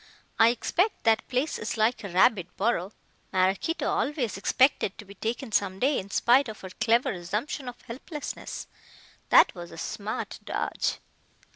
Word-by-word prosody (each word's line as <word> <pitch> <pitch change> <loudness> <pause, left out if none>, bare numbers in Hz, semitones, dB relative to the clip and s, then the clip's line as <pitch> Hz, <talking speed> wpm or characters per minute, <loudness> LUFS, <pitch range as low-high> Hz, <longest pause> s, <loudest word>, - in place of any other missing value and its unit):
"I 225 - +8
expect 360 - 0
that 225 -1 +3
place 260 +5 -1
is 215 +2 -3
like 220 +2 +1
a 200 - -5
rabbit 185 0 +2
burrow. 200 -3 0 0.4
Maraquito 190 - +1
always 270 -7 -1
expected 230 +1 +2
to 210 - -10
be 200 - -12
taken 230 +4 -4
some 195 -2 +1
day 270 +6 +2
in 195 - -8
spite 245 +5 +4
of 215 - -9
her 190 - -8
clever 230 +5 +2
assumption 210 - -3
of 245 - -11
helplessness. 280 +5 -6 0.6
That - - +7
was 175 -2 -8
a 165 - -11
smart 205 +5 -4
dodge." - - -2
220 Hz, 155 wpm, -27 LUFS, 195-255 Hz, 0.6 s, I